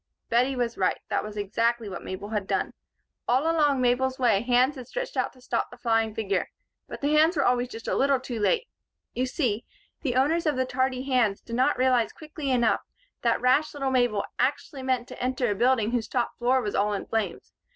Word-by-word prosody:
Bettie 250 +3 +2
was 240 -2 -2
right. 185 - +2
That - - 0
was 210 0 -7
exactly 230 +3 0
what 195 - -6
Mabel 200 +2 -6
had 210 -3 -2
done. - - -1 0.5
All 255 +3 +3
along 305 -4 +2
Mabel's 255 +1 +1
way 230 -6 +3
hands 250 +4 +3
had 255 -3 -9
stretched - - -5
out - - 0
to 255 - -20
stop - - -2
the 245 - -13
flying 225 -2 +1
figure. 200 -4 -1 0.4
But - - -8
the 290 +1 +1
hands 315 +3 +4
were 275 - +2
always 245 0 +2
just 230 -2 -9
a - - 0
little 275 -1 +3
too 245 -3 -5
late. 465 - +1 0.5
You 255 +1 -1
see, 245 -6 -1 0.4
the 255 -5 -1
owners 310 +6 +2
of 300 - +2
the 260 0 +1
tardy 255 0 -1
hands 250 -7 +1
did 230 - -7
not 255 +2 +2
realize 250 -2 +2
quickly 305 -2 -6
enough 240 -3 +2 0.4
that 235 -1 +1
rash 280 +5 +2
little 275 -2 -1
Mabel 245 -5 +2
actually 270 +1 -1
meant 255 -2 -1
to - - -9
enter 255 -2 0
a - - +2
building 235 0 +2
whose 240 -2 -1
top 245 -2 -1
floor 250 +1 +2
was 205 - -3
all 210 +1 +1
in 200 - -3
flames. 225 -2 -3
250 Hz, 215 wpm, -26 LUFS, 230-265 Hz, 0.5 s, hands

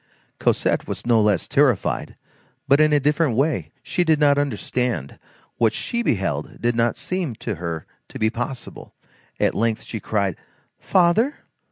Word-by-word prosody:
Cosette - - +1
was - - -5
no 115 -2 +4
less 105 -5 +2
terrified, 135 -8 +1 0.5
but 140 +2 +5
in 155 0 +5
a 150 - +4
different 150 -2 +1
way. 125 - 0
She 180 - 0
did 160 -3 +3
not 145 -1 +4
understand; 125 - -2 0.4
what 115 -2 +3
she 235 - -2
beheld 95 - -1
did 120 0 0
not 115 0 +2
seem 180 -10 -2
to 105 -3 -4
her 85 -2 -4 0.2
to - - -8
be 110 0 +1
possible; 120 +1 -6 0.4
at - - +2
length 115 0 0
she 110 - -6
cried:— 100 -4 -1 0.4
"Father! 190 +10 +3
120 Hz, 155 wpm, -22 LUFS, 105-150 Hz, 0.5 s, but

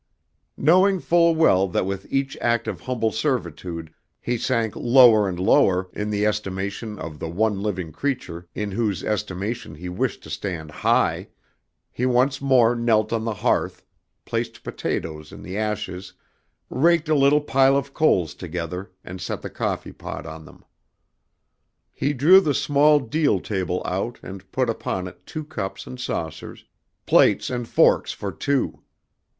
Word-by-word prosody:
Knowing 185 +6 +4
full 170 -1 +3
well 100 - +4
that 90 - -1
with 95 0 -5
each 135 0 -1
act 120 -1 +1
of - - -4
humble 115 -3 -1
servitude 85 - -3 0.3
he 120 - -2
sank 115 -2 -1
lower 120 -5 +6
and 90 -1 -5
lower 90 0 +3
in 105 0 -3
the 105 0 0
estimation 105 +1 -3
of 80 -3 -7
the 80 - -4
one 100 +3 0
living 95 -6 -3
creature 90 - -4
in 105 -1 -3
whose 105 -2 -1
estimation 105 -1 -3
he 90 +4 -7
wished 120 +8 -2
to - - -11
stand 80 -2 -5
high, - - +1 0.6
he 125 - -1
once 130 +2 +2
more 125 -4 +4
knelt 115 -2 +1
on 115 -1 -1
the 115 - -1
hearth, - - -1 0.4
placed - - -4
potatoes 75 -1 -4
in - - -11
the 95 - -7
ashes, 105 -3 -3 0.6
raked 165 +3 +3
a 155 - +2
little 140 0 +4
pile 135 -1 +3
of 140 0 -4
coals 90 - +2
together 90 +2 -5 0.2
and 90 0 -8
set 90 - -4
the - - -6
coffee - - -3
pot - - -7
on 80 -1 -9
them. - - -17 1.3
He 145 - -1
drew 165 +9 +7
the 150 -6 0
small 150 +1 +4
deal 140 -4 +1
table 90 -3 -2
out 100 +6 -3
and 95 0 -10
put 130 -1 0
upon 95 -5 -3
it 90 - -14
two 155 - -5
cups 105 -11 -5
and 125 - -9
saucers, 80 -10 -5 0.4
plates - - +4
and 120 -2 -3
forks - - +3
for 100 - -5
two. 140 +3 -1
110 Hz, 155 wpm, -23 LUFS, 90-130 Hz, 1.3 s, drew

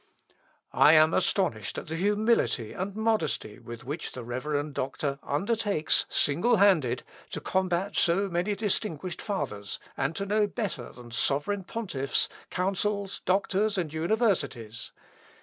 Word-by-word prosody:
_ - - -29 0.4
"I 155 - +7
am 155 0 +6
astonished 175 - +1
at - - -4
the 160 - -4
humility 205 - +1
and 190 +2 -4
modesty 220 - 0
with 120 0 -9
which 145 +6 -4
the 125 - -6
reverend 145 +5 -2
doctor 140 +1 -2
undertakes 200 +1 +1
single 175 +12 +3
handed 160 - +3 0.3
to - - -4
combat 190 +1 -1
so 190 +4 +3
many 180 +3 -1
distinguished 185 -4 -1
Fathers, 120 - -3 0.2
and 140 +4 -1
to 200 - -2
know 210 +1 +2
better 200 - -4
than 120 -1 -13
sovereign 145 - 0
pontiffs, 170 - 0 0.2
councils, 195 +2 -1
doctors, 200 +2 +1
and 165 -5 -2
universities.... 160 - -1
175 Hz, 130 wpm, -28 LUFS, 140-205 Hz, 0.4 s, I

